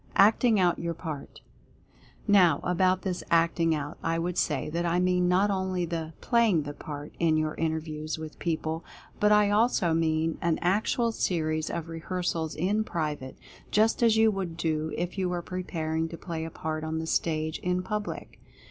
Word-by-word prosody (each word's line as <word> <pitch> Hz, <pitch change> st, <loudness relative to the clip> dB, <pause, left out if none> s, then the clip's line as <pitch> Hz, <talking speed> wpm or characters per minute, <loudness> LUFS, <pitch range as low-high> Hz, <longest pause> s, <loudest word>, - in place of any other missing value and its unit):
ACTING 215 Hz, +2 st, +5 dB
OUT 175 Hz, -2 st, +2 dB
YOUR 170 Hz, 0 st, -3 dB
PART. 155 Hz, -4 st, -7 dB, 0.9 s
Now 180 Hz, -7 st, +5 dB
about 185 Hz, +1 st, +2 dB
this 185 Hz, -2 st, -2 dB
Acting 165 Hz, -1 st, +3 dB
Out, 145 Hz, +1 st, -5 dB
I 165 Hz, 0 st, 0 dB
would 175 Hz, +1 st, -2 dB
say 150 Hz, -6 st, 0 dB
that 170 Hz, +2 st, -1 dB
I 170 Hz, +1 st, +1 dB
mean 180 Hz, 0 st, +2 dB
not 190 Hz, +3 st, +3 dB
only 185 Hz, -2 st, -1 dB
the 165 Hz, -1 st, -4 dB
"playing 230 Hz, -, +3 dB
the 145 Hz, 0 st, -6 dB
part" 145 Hz, 0 st, -8 dB
in 160 Hz, -2 st, +3 dB
your 155 Hz, 0 st, 0 dB
inter 160 Hz, 0 st, -1 dB
views 155 Hz, 0 st, -5 dB
with 155 Hz, -1 st, -8 dB
people, 160 Hz, -1 st, -2 dB, 0.4 s
but 210 Hz, -1 st, +4 dB
I 210 Hz, -1 st, +5 dB
also 210 Hz, -5 st, +3 dB
mean 160 Hz, 0 st, +1 dB
an 165 Hz, -2 st, +1 dB
actual 215 Hz, +5 st, +2 dB
series 155 Hz, -6 st, -1 dB
of 170 Hz, -1 st, -4 dB
rehearsals 165 Hz, -1 st, -3 dB
in 200 Hz, +6 st, +1 dB
private, 150 Hz, -9 st, -4 dB, 0.3 s
just 220 Hz, +3 st, +2 dB
as 225 Hz, -2 st, +5 dB
you 220 Hz, 0 st, +5 dB
would 185 Hz, -5 st, -4 dB
do 160 Hz, -2 st, -1 dB
if 175 Hz, +3 st, -3 dB
you 185 Hz, -1 st, 0 dB
were 175 Hz, -1 st, -2 dB
preparing 165 Hz, -3 st, -2 dB
to 165 Hz, -, -7 dB
play 165 Hz, -3 st, -5 dB
a -, -, -5 dB
part 155 Hz, 0 st, -4 dB
on 160 Hz, 0 st, -2 dB
the 160 Hz, -, -3 dB
stage, 160 Hz, -1 st, -1 dB
in 180 Hz, 0 st, -1 dB
public. 210 Hz, +1 st, -5 dB
170 Hz, 180 wpm, -28 LUFS, 160-185 Hz, 0.9 s, ACTING